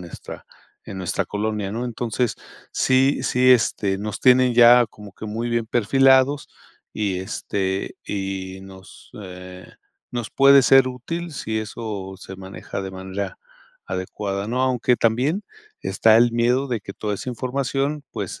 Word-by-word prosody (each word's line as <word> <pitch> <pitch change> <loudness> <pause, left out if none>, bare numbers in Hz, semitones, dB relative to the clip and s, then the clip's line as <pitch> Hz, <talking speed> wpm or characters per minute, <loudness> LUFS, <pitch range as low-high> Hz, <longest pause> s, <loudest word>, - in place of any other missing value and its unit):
nuestra 85 -2 -10 0.4
en 95 - -7
nuestra 90 - -1
colonia, 105 -1 -2
¿no? 120 +2 -3
Entonces, 120 0 -2 0.4
sí 130 +2 +2
sí, 130 +1 +3
este, 105 -5 +2
nos 105 0 -5
tienen 125 -1 +5
ya 120 0 +7
como 105 -3 -13
que 110 - -9
muy 115 +3 -3
bien 115 -1 0
perfilados 135 +4 +3 0.4
y, 100 -4 -1
este, 95 0 -3
y 95 -1 -4
nos, 95 0 -14
eh, 90 0 -10 0.5
nos 120 -3 -4
puede 140 0 +6
ser 135 0 +6
útil 165 +7 -5
si 110 -5 -3
eso 105 -3 -6
se 95 -1 -10
maneja 95 +1 -7
de 95 - -5
manera 95 +1 -5 0.5
adecuada, 100 +2 -4
¿no? 125 +3 -1
Aunque 125 -1 +2
también 130 - +1 0.4
está 110 0 +3
el 120 0 +4
miedo 125 +4 +1
de 120 -4 -2
que 100 - -9
toda 105 0 -3
esa 125 +5 -5
información, 135 +4 -2
pues, - - -5
110 Hz, 145 wpm, -22 LUFS, 95-125 Hz, 0.5 s, ya